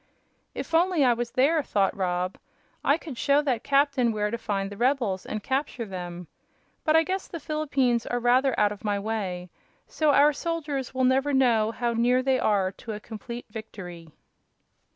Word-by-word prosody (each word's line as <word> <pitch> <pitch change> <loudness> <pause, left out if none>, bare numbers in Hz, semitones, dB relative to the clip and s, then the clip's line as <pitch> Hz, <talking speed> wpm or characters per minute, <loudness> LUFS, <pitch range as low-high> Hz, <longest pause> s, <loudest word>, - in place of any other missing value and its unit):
"If - - -6
only 335 -3 +3
I 245 - +5
was 235 0 -3
there," 290 +7 +3
thought 200 -8 0
Rob, 180 -1 -2 0.4
"I 285 - +3
could 295 -8 -9
show 285 +1 +3
that 255 -6 -1
captain 275 -4 +2
where 210 -1 -1
to 235 - -2
find 195 -2 -2
the - - -7
rebels 235 -5 0
and 215 -1 -4
capture 265 -3 -2
them. 180 -2 -7 0.6
But 310 - +3
I 320 - +6
guess 375 +4 -3
the 335 - -7
Philippines 275 -6 0
are 245 - -1
rather 250 +2 +3
out 210 -1 +3
of 205 - -8
my 205 -1 0
way, 195 -4 -3 0.3
so 310 -1 0
our 290 +1 +5
soldiers 290 -5 -3
will 260 - +1
never 265 +3 +2
know 235 -5 +3
how 235 +1 -1
near 245 +2 +2
they 260 -1 +2
are 195 -3 +2
to 225 - -5
a 210 - -6
complete 235 +3 -8
victory." 180 -7 -9
240 Hz, 180 wpm, -26 LUFS, 210-280 Hz, 0.6 s, I